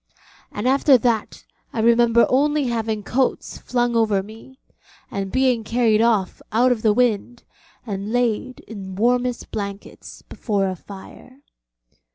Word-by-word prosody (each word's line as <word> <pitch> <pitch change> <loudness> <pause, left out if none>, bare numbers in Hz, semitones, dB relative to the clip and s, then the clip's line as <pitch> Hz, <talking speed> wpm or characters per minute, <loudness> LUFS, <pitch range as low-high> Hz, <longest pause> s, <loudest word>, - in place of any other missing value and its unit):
And 205 +4 -3
after 270 0 +5
that 230 -3 -2 0.3
I - - -4
remember 235 +1 +4
only 295 +3 +2
having 225 -4 -2
coats 255 +5 -1
flung 240 -1 -1
over 215 -4 +2
me, 225 +5 -14 0.5
and 195 -1 -4
being 255 -3 +1
carried 225 -1 +2
off 220 -5 +1
out 245 +3 +3
of 235 -3 -1
the 215 - +3
wind, 240 +1 0 0.4
and 200 -1 -5
laid 245 +1 -1
in 195 -4 -9
warmest 245 +3 0
blankets 200 -1 -7
before 200 -4 -2
a 185 - -3
fire. 205 - -13
230 Hz, 135 wpm, -21 LUFS, 210-250 Hz, 0.5 s, after